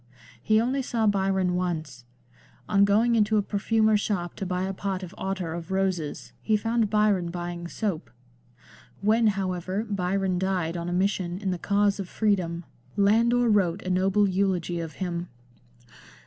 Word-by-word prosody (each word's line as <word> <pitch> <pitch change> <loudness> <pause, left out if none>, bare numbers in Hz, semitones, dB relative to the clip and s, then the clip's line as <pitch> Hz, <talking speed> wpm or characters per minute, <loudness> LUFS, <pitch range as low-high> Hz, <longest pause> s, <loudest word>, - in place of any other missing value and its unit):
He 215 - +3
only 255 +4 0
saw 235 -3 -1
Byron 190 -3 +1
once. 160 -8 -3 0.6
On 200 -1 +4
going 220 +4 +3
into 215 -1 +3
a 205 - +2
perfumer's 215 +1 +2
shop 175 -5 -2
to 195 - -3
buy 180 0 -1
a 190 +1 -2
pot 190 -1 -3
of 180 0 -8
ottar 190 -4 -3
of 170 0 -7
roses 190 -5 -2
he 215 -1 +2
found 225 0 0
Byron 210 -4 +2
buying 175 0 -5
soap. 170 - -3 0.9
When, 220 +3 +3
however, 190 0 -1
Byron 190 -2 0
died 180 -3 -1
on 170 0 -3
a - - -3
mission 185 -1 0
in 195 -1 -2
the 180 - -3
cause 205 +1 +1
of 190 -2 -5
freedom 180 -6 0 0.3
Landor 230 +4 +3
wrote 200 -4 +2
a 185 - -2
noble 195 +3 +3
eulogy 185 -3 0
of 165 -1 -5
him. 175 -2 -4
190 Hz, 160 wpm, -26 LUFS, 175-210 Hz, 0.9 s, On